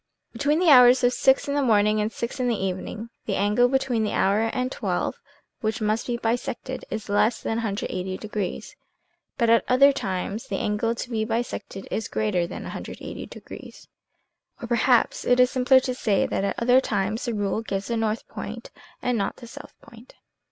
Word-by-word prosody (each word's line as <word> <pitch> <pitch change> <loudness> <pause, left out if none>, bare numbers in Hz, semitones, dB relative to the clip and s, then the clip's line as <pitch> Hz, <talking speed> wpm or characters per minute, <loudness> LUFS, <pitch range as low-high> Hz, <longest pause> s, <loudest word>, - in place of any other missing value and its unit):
" - - -56
Between 290 +2 +1
the 345 -2 +4
hours 250 -1 +7
of 245 0 +4
six 265 +2 +3
in 280 - -1
the 290 - +1
morning 215 -3 +3
and 210 +1 -1
six 235 +4 -5
in 250 - 0
the 235 -3 +1
evening 195 +4 -4 0.2
the 200 - 0
angle 210 +5 +3
between 260 -4 +1
the 210 - -1
hour 200 +3 +2
and 255 +1 -2
XII, - - -2 0.4
which 220 +1 -2
must 215 +1 -1
be 240 -1 -1
bisected 235 +2 -3
is 220 -1 -5
less 210 +3 +2
than 225 - -1
180 190 -4 -3
degrees, 210 -3 -5 0.6
but 235 - +2
at 230 - +5
other 275 +3 +6
times 200 -1 -4
the 195 - -2
angle 210 +4 -1
to 240 - -6
be 220 -1 0
bisected 225 -3 -4
is 220 - -2
greater 185 -5 0
than - - -7
180 - - -7
degrees; - - -12 0.7
or 235 - -6
per 240 - -1
haps 240 +1 +2
it 245 0 +3
is 250 0 +5
simpler 260 +1 +5
to 255 -1 -3
say 215 -6 +1
that - - -2
at 200 - -1
other 245 +2 +4
times 205 -1 -2
the 240 - -2
rule 205 +1 -1
gives 200 -3 -3
the 235 - -2
north 225 0 -1
point - - -8 0.3
and 245 -3 0
not 195 - -2
the - - -12
south 235 - -11
point. 230 +2 -16
230 Hz, 195 wpm, -24 LUFS, 210-250 Hz, 0.7 s, hours